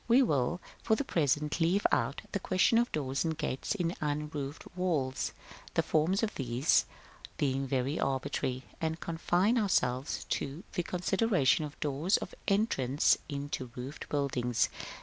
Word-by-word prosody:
We 245 +3 +6
will, 145 - +1 0.2
for 220 - +3
the 285 - -1
present, 150 - +1
leave 180 +5 +2
out 130 +3 0
of - - -24
the 200 - -1
question 190 +6 +3
doors 135 -3 -1
and 160 -2 -1
gates 150 +2 -2
in 175 -3 0
unroofed 150 -1 -3
walls, 155 -8 0 0.4
the - - +3
forms 175 +7 +2
of 220 - 0
these 125 +1 +2 0.5
being 135 -1 0
very 135 +3 0
arbitrary, 130 -1 -1 0.2
and 160 0 -1
confine 175 +7 +1
ourselves 130 - +1
to 145 +6 -2
the 180 - 0
consideration 180 - +2
of 145 - -10
doors 150 +6 +2
of - - -7
entrance 160 - +3
into 140 -3 -4
roofed 130 +4 -7
buildings. 125 -5 +1
150 Hz, 145 wpm, -31 LUFS, 135-180 Hz, 0.5 s, We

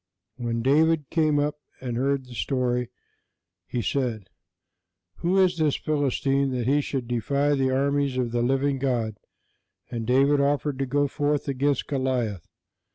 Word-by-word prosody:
When 115 -2 -2
David 150 +2 +3
came 155 -3 +2
up 145 +1 0 0.2
and 125 -2 -4
heard 135 +2 0
the 125 - -12
story, 125 0 -1 0.8
he 120 -2 -2
said: 115 -8 -2 0.9
"Who 180 +3 +1
is 185 -3 +3
this 155 -3 +2
Philistine, 140 -2 0
that 125 -2 -2
he 145 +3 +3
should 135 -4 -4
defy 140 +5 +1
the 135 -2 +1
armies 140 0 +1
of 125 -2 -1
the 120 0 0
living 135 +2 +1
God?" 120 -5 -1 0.7
And 115 -2 -4
David 140 +3 +4
offered 140 -1 0
to 135 - -1
go 145 +2 +1
forth 145 +1 -1
against 140 0 0
Goliath. 125 - -2
135 Hz, 150 wpm, -25 LUFS, 125-145 Hz, 0.9 s, David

